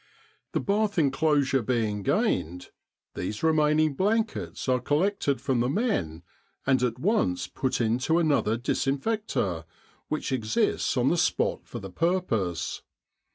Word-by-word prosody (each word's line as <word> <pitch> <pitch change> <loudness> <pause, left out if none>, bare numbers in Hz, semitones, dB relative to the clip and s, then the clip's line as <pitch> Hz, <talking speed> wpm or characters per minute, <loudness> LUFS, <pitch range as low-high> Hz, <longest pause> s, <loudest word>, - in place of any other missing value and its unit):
The - - +1
bath 205 0 0
enclosure 140 -2 +2
being 110 -3 -1
gained, 90 -2 -1 0.4
these 105 - -4
remain 155 -1 +3
ing 155 -2 +3
blankets 215 - -1
are 130 -1 +3
collected 145 - 0
from 130 -1 0
the 120 +1 +1
men 130 - -1 0.4
and 130 -2 +3
at 125 -2 0
once 140 - +1
put 130 - -2
into 125 +8 +1
another 145 -9 +2
disinfect 140 - -1
or, 85 -5 -1 0.4
which 155 -2 -3
exists 115 -4 0
on - - +3
the - - +1
spot - - 0
for - - -7
the 95 - -8
purpose. 115 - -1
135 Hz, 135 wpm, -27 LUFS, 115-165 Hz, 0.4 s, remain